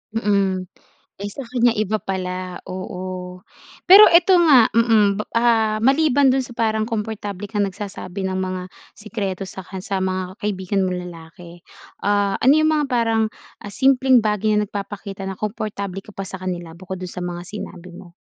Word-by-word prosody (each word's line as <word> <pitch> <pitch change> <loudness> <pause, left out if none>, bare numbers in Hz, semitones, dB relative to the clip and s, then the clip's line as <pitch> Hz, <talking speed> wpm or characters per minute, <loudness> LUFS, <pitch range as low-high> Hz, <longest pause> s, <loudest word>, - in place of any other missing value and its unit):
Mm. 200 -4 +1 0.6
Eh, 205 - -3
sa 265 +6 -8
kanya 245 -1 +3
iba 215 0 -1
pala 185 -1 -4
oo. 185 -1 -6 0.4
Pero 395 +2 +10
ito 345 +2 +5
nga 275 -9 +7
mm, 215 -3 +3 0.2
ah, 225 -2 +3
maliban 275 +1 +4
do'n 265 - +2
sa 240 - -11
parang 220 -2 +1
komportable 210 -3 -4
kang 205 0 -2
nagsasabi 195 -1 -6
ng 190 0 -2
mga 185 0 -3 0.4
sikreto 205 -3 -4
sa 190 0 -8
ka 190 +1 -9
sa 195 -1 -2
mga 185 -1 -2
kaibigan 195 -1 -1
mong 180 -1 -2
lalaki. 170 +1 -13 0.4
Ah, 205 -1 +1
ano 265 +3 +6
'yong 310 0 +3
mga 300 -1 +1
parang 225 -2 +2 0.5
simpleng, 260 +2 +4
ah, 215 -1 +1
bagay 210 +1 +1
na 210 - +1
nagpapakita 200 -1 -6
na 190 - -6
komportable 200 -2 -4
ka - - -14
pa 195 - -5
sa 190 0 -8
kanila 175 -3 -5
bukod 185 +1 -7
do'n 180 - -5
sa 180 - -7
mga 175 -1 -4
sinabi 180 -2 -8
mo? 175 0 -13
200 Hz, 170 wpm, -21 LUFS, 185-225 Hz, 0.6 s, Pero